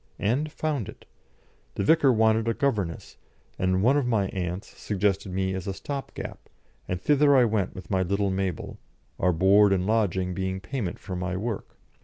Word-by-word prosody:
And 135 Hz, +9 st, 0 dB
found 150 Hz, -9 st, -2 dB
it. -, -, -13 dB, 0.7 s
The -, -, -1 dB
vicar 145 Hz, +2 st, +5 dB
wanted 110 Hz, -1 st, +3 dB
a 115 Hz, -, +1 dB
governess, 105 Hz, -12 st, -2 dB, 0.4 s
and 95 Hz, +1 st, +1 dB
one 130 Hz, +5 st, +4 dB
of 140 Hz, -4 st, 0 dB
my 105 Hz, -5 st, +1 dB
aunts 90 Hz, +2 st, -5 dB
suggested 100 Hz, -2 st, -1 dB
me 95 Hz, 0 st, -1 dB
as 95 Hz, 0 st, -5 dB
a 95 Hz, -, -3 dB
stop 140 Hz, +4 st, -6 dB
gap, -, -, -8 dB, 0.4 s
and 90 Hz, -, -2 dB
thither 145 Hz, +4 st, +4 dB
I 125 Hz, -, +6 dB
went 105 Hz, -4 st, -1 dB
with 95 Hz, -, -9 dB
my 95 Hz, -1 st, +2 dB
little 100 Hz, +2 st, 0 dB
Mabel, 95 Hz, -3 st, -3 dB, 0.4 s
our 90 Hz, -, +3 dB
board 100 Hz, +4 st, +5 dB
and 95 Hz, -1 st, +1 dB
lodging 95 Hz, -4 st, +1 dB
being 95 Hz, 0 st, -2 dB
payment 100 Hz, -1 st, -4 dB
for 95 Hz, -, -7 dB
my 90 Hz, 0 st, -2 dB
work. 110 Hz, +1 st, -5 dB
100 Hz, 180 wpm, -26 LUFS, 95-115 Hz, 0.7 s, I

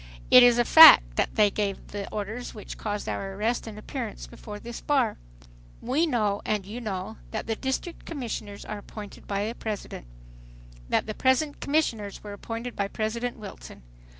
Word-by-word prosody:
It 250 Hz, -, +10 dB
is 245 Hz, -1 st, +6 dB
a 240 Hz, -, +3 dB
fact -, -, +9 dB
that -, -, 0 dB
they 210 Hz, -2 st, +4 dB
gave 200 Hz, -2 st, -3 dB
the 200 Hz, -1 st, -6 dB
orders 220 Hz, +5 st, -5 dB
which 210 Hz, -, -8 dB
caused 205 Hz, -1 st, -4 dB
our 195 Hz, 0 st, -4 dB
arrest 225 Hz, +4 st, -1 dB
and 215 Hz, -1 st, -8 dB
appearance -, -, -6 dB
before 205 Hz, -, -10 dB
this 235 Hz, +1 st, -8 dB
bar. 265 Hz, -7 st, +1 dB, 0.6 s
"We 285 Hz, +8 st, +1 dB
know 210 Hz, -7 st, 0 dB
and 210 Hz, -3 st, -1 dB
you 220 Hz, +5 st, -7 dB
know, 190 Hz, -5 st, -5 dB
that -, -, -4 dB
the 225 Hz, -, -2 dB
District 265 Hz, +8 st, -4 dB
Commissioners 230 Hz, -9 st, -6 dB
are 210 Hz, -1 st, -5 dB
appointed 205 Hz, 0 st, -11 dB
by 200 Hz, 0 st, -1 dB
the 225 Hz, -, -3 dB
President, 210 Hz, -, -6 dB, 0.8 s
that -, -, +1 dB
the 215 Hz, -, -4 dB
present 260 Hz, +5 st, +1 dB
commissioners 235 Hz, -9 st, -1 dB
were 205 Hz, -1 st, -7 dB
appointed 230 Hz, +3 st, -6 dB
by 200 Hz, -, -1 dB
President 230 Hz, +4 st, -3 dB
Wilson. 205 Hz, -, -11 dB
215 Hz, 175 wpm, -26 LUFS, 205-245 Hz, 0.8 s, It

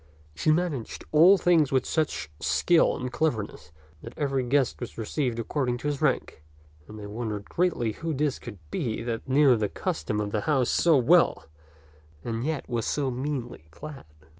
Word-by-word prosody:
She 75 Hz, -, -1 dB
managed 155 Hz, -7 st, -2 dB
all 170 Hz, +6 st, +7 dB
things 165 Hz, -5 st, +3 dB
with 130 Hz, -1 st, +2 dB
such 155 Hz, -, -1 dB
skill 170 Hz, -2 st, +3 dB
and 125 Hz, 0 st, -5 dB
cleverness 105 Hz, -, -2 dB, 0.3 s
that -, -, -11 dB
every 135 Hz, -3 st, 0 dB
guest 130 Hz, +1 st, +1 dB
was 120 Hz, -, -7 dB
received 120 Hz, +2 st, -2 dB
according 125 Hz, +1 st, -1 dB
to 140 Hz, -, -5 dB
his 145 Hz, -1 st, -2 dB
rank, 75 Hz, -, 0 dB, 0.4 s
and 110 Hz, -, -10 dB
they 105 Hz, -, -8 dB
wondered 105 Hz, -1 st, -4 dB
greatly 170 Hz, -11 st, 0 dB
who 165 Hz, +9 st, -4 dB
this 145 Hz, -1 st, -1 dB
could 115 Hz, -4 st, -9 dB
be 115 Hz, -2 st, -2 dB
that 115 Hz, +2 st, -4 dB
knew 135 Hz, -1 st, +5 dB
the 105 Hz, -3 st, -1 dB
custom 90 Hz, +5 st, -3 dB
of 105 Hz, -1 st, -2 dB
the 105 Hz, -, -1 dB
house 135 Hz, -1 st, +1 dB
so 165 Hz, -4 st, +4 dB
well 150 Hz, -, +4 dB, 0.8 s
and 115 Hz, 0 st, -3 dB
yet 155 Hz, -1 st, -3 dB
was 120 Hz, -3 st, -2 dB
so 140 Hz, -3 st, 0 dB
meanly 125 Hz, -, -4 dB
clad. 140 Hz, -, -10 dB
130 Hz, 170 wpm, -26 LUFS, 115-150 Hz, 0.8 s, all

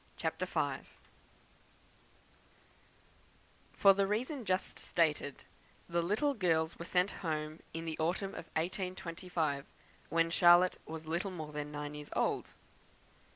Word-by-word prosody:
CHAPTER -, -, -2 dB
V -, -, -1 dB, 2.9 s
For 195 Hz, -1 st, +7 dB
the 195 Hz, 0 st, +2 dB
reason 245 Hz, +5 st, -1 dB
just 185 Hz, -1 st, 0 dB
stated, 150 Hz, -4 st, 0 dB, 0.4 s
the 170 Hz, 0 st, +1 dB
little 215 Hz, -, +1 dB
girls 165 Hz, -7 st, +1 dB
were 170 Hz, -, -5 dB
sent 180 Hz, +3 st, +2 dB
home 155 Hz, -2 st, -2 dB
in 165 Hz, 0 st, -5 dB
the 160 Hz, -1 st, -4 dB
autumn 175 Hz, +5 st, 0 dB
of -, -, -7 dB
1825, 170 Hz, -4 st, -2 dB, 0.4 s
when 165 Hz, +1 st, +2 dB
Charlotte 175 Hz, +1 st, +6 dB
was 160 Hz, 0 st, -6 dB
little 170 Hz, +5 st, -1 dB
more 160 Hz, -5 st, -6 dB
than 150 Hz, 0 st, -4 dB
nine 145 Hz, 0 st, -4 dB
years 150 Hz, 0 st, -8 dB
old. -, -, +1 dB
170 Hz, 120 wpm, -34 LUFS, 155-185 Hz, 2.9 s, For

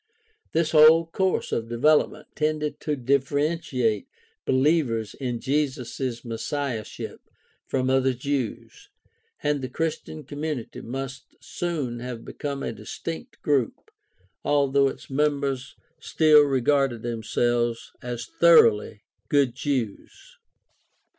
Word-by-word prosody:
This 160 Hz, -1 st, +1 dB
whole 160 Hz, +1 st, +7 dB
course 185 Hz, +3 st, -1 dB
of 115 Hz, 0 st, -2 dB
development 150 Hz, +4 st, +2 dB
tended 150 Hz, -1 st, -1 dB
to 150 Hz, -, -1 dB
differentiate 140 Hz, -, 0 dB, 0.4 s
believers 130 Hz, -5 st, +2 dB
in 125 Hz, -3 st, -3 dB
Jesus' 130 Hz, -3 st, -2 dB
messiahship 115 Hz, 0 st, -4 dB, 0.5 s
from 130 Hz, -1 st, 0 dB
other 130 Hz, 0 st, +2 dB
Jews, 140 Hz, -, -4 dB, 0.5 s
and 145 Hz, -1 st, +1 dB
the 130 Hz, -, -4 dB
Chris 160 Hz, +4 st, -1 dB
tian 155 Hz, -1 st, -9 dB
community 145 Hz, -2 st, -5 dB
must 135 Hz, +2 st, -7 dB
soon 145 Hz, -9 st, -3 dB
have 120 Hz, -1 st, -6 dB
become 140 Hz, -1 st, -5 dB
a -, -, -3 dB
distinct 165 Hz, -, -7 dB
group, 140 Hz, -7 st, 0 dB, 0.5 s
although 140 Hz, -1 st, +3 dB
its -, -, -6 dB
members 140 Hz, -2 st, 0 dB, 0.2 s
still 155 Hz, -2 st, +5 dB
regarded 135 Hz, -3 st, +2 dB
themselves 120 Hz, 0 st, -1 dB
as 120 Hz, -1 st, -5 dB
thoroughly 110 Hz, -11 st, +4 dB, 0.3 s
good 140 Hz, -4 st, +3 dB
Jews. 145 Hz, -, -4 dB
135 Hz, 105 wpm, -25 LUFS, 120-150 Hz, 0.5 s, whole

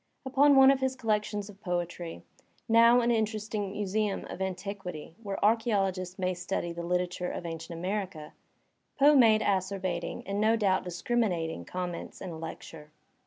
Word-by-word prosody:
Upon 280 Hz, +2 st, +5 dB
one 270 Hz, 0 st, +8 dB
of 275 Hz, -, +1 dB
his 265 Hz, 0 st, 0 dB
collections 210 Hz, -3 st, -1 dB
of 205 Hz, -1 st, -14 dB
poetry 175 Hz, -2 st, -4 dB, 0.2 s
— -, -, -38 dB
now 230 Hz, +2 st, +6 dB
an 240 Hz, 0 st, +2 dB
interesting 215 Hz, -2 st, -1 dB
museum 205 Hz, 0 st, -1 dB
of -, -, -7 dB
antiquity 190 Hz, -4 st, -5 dB
where 200 Hz, -3 st, -4 dB
archaeologists 195 Hz, -5 st, +1 dB
may 185 Hz, -1 st, 0 dB
study 175 Hz, -1 st, -3 dB
the 170 Hz, -, -5 dB
Uterature 180 Hz, +1 st, -1 dB
of -, -, -6 dB
ancient 165 Hz, 0 st, -6 dB
America 185 Hz, -4 st, -4 dB, 0.3 s
— -, -, -47 dB
Poe 290 Hz, +2 st, +7 dB
made 225 Hz, -5 st, +6 dB
acerbating, 185 Hz, -3 st, -1 dB
and 200 Hz, +2 st, -2 dB
no 220 Hz, +1 st, +4 dB
doubt 195 Hz, -4 st, +1 dB
discriminating, 175 Hz, -, -1 dB
comments 180 Hz, -2 st, -5 dB
in 185 Hz, -, -6 dB
a 160 Hz, -, -7 dB
lecture. 160 Hz, -1 st, -9 dB
195 Hz, 160 wpm, -29 LUFS, 175-220 Hz, 0.3 s, one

